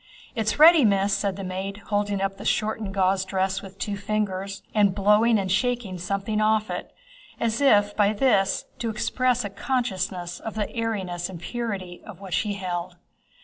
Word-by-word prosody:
"It's 220 Hz, -3 st, -1 dB
ready, 320 Hz, 0 st, +8 dB
Miss," 200 Hz, -2 st, +3 dB
said 200 Hz, -2 st, -1 dB
the 195 Hz, -, -6 dB
maid, 190 Hz, +2 st, -4 dB
holding 205 Hz, -1 st, 0 dB
up 195 Hz, 0 st, -1 dB
the -, -, -9 dB
shortened 215 Hz, -1 st, -1 dB
gauze 190 Hz, 0 st, +2 dB
dress 190 Hz, 0 st, -1 dB
with 195 Hz, -1 st, -12 dB
two 205 Hz, 0 st, -3 dB
fingers, 200 Hz, -1 st, -3 dB
and 205 Hz, -3 st, +3 dB
blowing 210 Hz, +3 st, +4 dB
and 190 Hz, -2 st, -1 dB
shaking 220 Hz, -3 st, 0 dB
something 200 Hz, +4 st, -1 dB
off 215 Hz, 0 st, +2 dB
it, -, -, -5 dB, 0.5 s
as 230 Hz, +2 st, 0 dB
if 205 Hz, -7 st, +4 dB
by 205 Hz, -1 st, +3 dB
this 205 Hz, -4 st, +2 dB
to 230 Hz, -, -2 dB
express 250 Hz, +2 st, 0 dB
a -, -, -3 dB
consciousness 190 Hz, -7 st, -2 dB
of 220 Hz, -, -6 dB
the 210 Hz, -2 st, -2 dB
airiness 190 Hz, -7 st, -2 dB
and 180 Hz, -3 st, -8 dB
purity 195 Hz, -4 st, -5 dB
of 210 Hz, -5 st, -11 dB
what 195 Hz, -3 st, -8 dB
she 210 Hz, -2 st, 0 dB
held. 180 Hz, -2 st, -4 dB
200 Hz, 175 wpm, -25 LUFS, 190-220 Hz, 0.5 s, ready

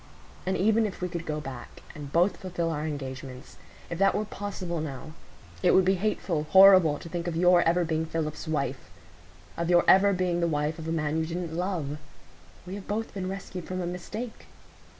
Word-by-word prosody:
And 190 Hz, 0 st, +1 dB
even 220 Hz, +3 st, +3 dB
if 195 Hz, -, -8 dB
we 180 Hz, -, -2 dB
could 170 Hz, -1 st, -6 dB
go 155 Hz, -1 st, -2 dB
back, 135 Hz, -4 st, -9 dB
and 145 Hz, -2 st, -8 dB
both 175 Hz, +5 st, +3 dB
fulfil 175 Hz, -3 st, -3 dB
our 150 Hz, 0 st, -2 dB
engagements,—if 135 Hz, +3 st, -8 dB
that 195 Hz, 0 st, +4 dB
were 215 Hz, -, 0 dB
possible 190 Hz, -5 st, -4 dB
now,—it 155 Hz, +5 st, -3 dB
would 185 Hz, -, +5 dB
be 190 Hz, -, +4 dB
hateful, 180 Hz, -5 st, -1 dB
horrible, 190 Hz, -5 st, +7 dB
to -, -, -10 dB
think 170 Hz, +1 st, -4 dB
of 170 Hz, -, -2 dB
your 175 Hz, +1 st, +5 dB
ever 170 Hz, +1 st, +2 dB
being 160 Hz, 0 st, -1 dB
Philip's 160 Hz, 0 st, -3 dB
wife,—of 90 Hz, -, -6 dB
your 175 Hz, -1 st, +5 dB
ever 200 Hz, +1 st, +6 dB
being 180 Hz, -2 st, 0 dB
the 170 Hz, -, +1 dB
wife 150 Hz, +1 st, -1 dB
of 160 Hz, -, -6 dB
a -, -, -1 dB
man 155 Hz, -1 st, -1 dB
you 160 Hz, -, -1 dB
didn't 170 Hz, -1 st, -4 dB
love. 170 Hz, -5 st, -2 dB, 0.7 s
We 185 Hz, -, -7 dB
have 200 Hz, -1 st, -7 dB
both 220 Hz, +2 st, -3 dB
been 185 Hz, -2 st, -4 dB
rescued 190 Hz, -2 st, -6 dB
from 185 Hz, 0 st, -4 dB
a 180 Hz, -, -2 dB
mistake." 210 Hz, +7 st, -6 dB
170 Hz, 190 wpm, -27 LUFS, 150-185 Hz, 0.7 s, horrible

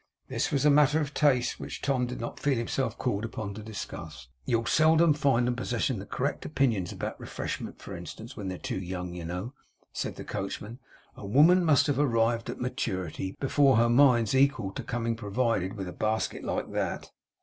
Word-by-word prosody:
This -, -, 0 dB
was 140 Hz, 0 st, +1 dB
a 150 Hz, -, +7 dB
matter 150 Hz, +1 st, +5 dB
of 150 Hz, -2 st, -3 dB
taste, 130 Hz, -5 st, +2 dB
which -, -, -6 dB
Tom 130 Hz, -3 st, 0 dB
did 125 Hz, -, -6 dB
not 115 Hz, -, -5 dB
feel 140 Hz, -3 st, +1 dB
himself 120 Hz, +3 st, -1 dB
called 105 Hz, -4 st, -1 dB
upon 110 Hz, -3 st, -4 dB
to 110 Hz, -, -8 dB
discuss. 100 Hz, -, -8 dB, 0.2 s
'You'll 115 Hz, -1 st, +1 dB
seldom 160 Hz, +2 st, +5 dB
find 135 Hz, -5 st, +2 dB
'em 125 Hz, -, 0 dB
possessing 120 Hz, -3 st, -1 dB
correct 140 Hz, +3 st, -2 dB
opinions 120 Hz, -, 0 dB
about -, -, -5 dB
refreshment, -, -, -5 dB
for -, -, -8 dB
instance, 115 Hz, +4 st, -9 dB
when 105 Hz, -4 st, -5 dB
they're 95 Hz, -1 st, -4 dB
too 95 Hz, -, -4 dB
young, 90 Hz, -1 st, -5 dB
you 90 Hz, -2 st, -6 dB
know,' 90 Hz, +9 st, -4 dB, 0.4 s
said -, -, -3 dB
the -, -, -7 dB
coachman; 105 Hz, +5 st, -5 dB, 0.4 s
'a 100 Hz, -, -8 dB
woman 160 Hz, -, +6 dB
must 155 Hz, -5 st, +4 dB
have 145 Hz, -3 st, 0 dB
arrived 115 Hz, -4 st, +2 dB
at -, -, -5 dB
maturity, 95 Hz, -8 st, -3 dB
before 135 Hz, -2 st, +4 dB
her 115 Hz, +1 st, +4 dB
mind's 120 Hz, -3 st, +5 dB
equal 130 Hz, -7 st, +2 dB
to -, -, -5 dB
coming 115 Hz, -2 st, -2 dB
provided 115 Hz, -2 st, -1 dB
with 95 Hz, -2 st, -4 dB
a 90 Hz, -, -6 dB
basket 110 Hz, +4 st, -1 dB
like -, -, -3 dB
that. -, -, -3 dB
120 Hz, 190 wpm, -28 LUFS, 105-140 Hz, 0.4 s, a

